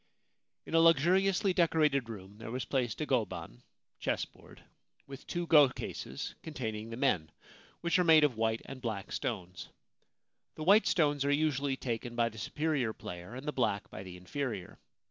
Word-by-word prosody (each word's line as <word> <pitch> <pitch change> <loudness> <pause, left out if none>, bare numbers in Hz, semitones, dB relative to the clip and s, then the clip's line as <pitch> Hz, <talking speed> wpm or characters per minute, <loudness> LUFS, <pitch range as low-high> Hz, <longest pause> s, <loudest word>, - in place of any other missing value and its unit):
In - - -9
a 165 - +6
luxuriously 180 +5 +4
decorated 155 -7 +2
room 100 -1 -9
there 110 - -7
was 125 +2 -3
placed 125 -1 -1
a - - 0
goban 110 - -2 0.4
(chessboard) - - -4 0.4
with 135 0 -11
two 175 0 -2
go 150 -5 +7
cases - - -6
containing 110 -7 -5
the 115 - -6
men, 95 - +1 0.5
which 170 +1 +2
are - - +4
made 160 -3 +7
of 145 -5 +3
white 110 0 0
and 135 -1 -9
black 110 -5 -4
stones. 90 -5 -4 0.9
The 155 - -5
white 200 +6 +6
stones 145 -4 +2
are 140 - 0
usually 145 -2 +1
taken 120 -1 -4
by 115 -1 +2
the 110 -1 -11
superior 140 - -1
player 90 0 -8
and 130 +4 -8
the 150 - -1
black 105 -6 -1
by - - -7
the 90 -2 -9
inferior. 105 0 -5
130 Hz, 165 wpm, -32 LUFS, 110-155 Hz, 0.9 s, go